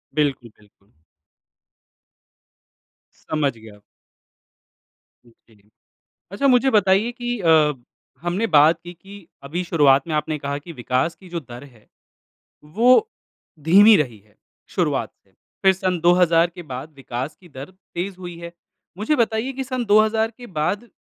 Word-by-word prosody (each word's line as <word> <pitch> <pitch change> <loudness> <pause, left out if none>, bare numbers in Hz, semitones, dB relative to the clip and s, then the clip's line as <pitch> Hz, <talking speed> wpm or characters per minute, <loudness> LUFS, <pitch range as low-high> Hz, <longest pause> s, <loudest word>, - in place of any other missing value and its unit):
बिल्कुल, 140 -6 -1
बिल्कुल। 100 -4 -28 2.3
समझ 145 -6 -1
गया। 110 -2 -15 1.5
जी। 110 -3 -26 0.6
अच्छा 275 +8 0
मुझे 260 0 +4
बताइए 205 +1 +2
कि 240 -1 -4
अ, 160 -4 +4 0.5
हमने 180 +6 -1
बात 150 +3 +5
की 175 0 -9
कि 195 +2 -14 0.2
अभी 170 +6 -4
शुरुआत 145 -4 +3
में 160 - -3
आपने 150 0 -2
कहा 140 0 -4
कि 155 +4 -10
विकास 130 +5 -1
की 185 -2 -17
जो 170 -1 -4
दर 120 -1 -12
है, 120 -6 -19 0.8
वो 245 - +3 0.5
धीमी 205 +6 +7
रही 120 -7 -2
है 105 +1 -30 0.3
शुरुआत - - -1
से, - - -33 0.3
फिर 190 0 +6
सन 185 -2 -2
2000 170 -1 +4
के 175 - -8
बाद 130 +5 -7
विकास 130 +3 -6
की 175 -2 -18
दर 135 +4 -10 0.3
तेज़ 185 +2 -4
हुई 175 -2 -9
है। 170 0 -8 0.5
मुझे 220 +9 0
बताइए 230 +2 0
की 265 +1 -4
सन 255 -2 -4
2000 220 +2 +3
के 245 - -11
बाद 205 +9 -2
170 Hz, 140 wpm, -21 LUFS, 140-205 Hz, 2.3 s, धीमी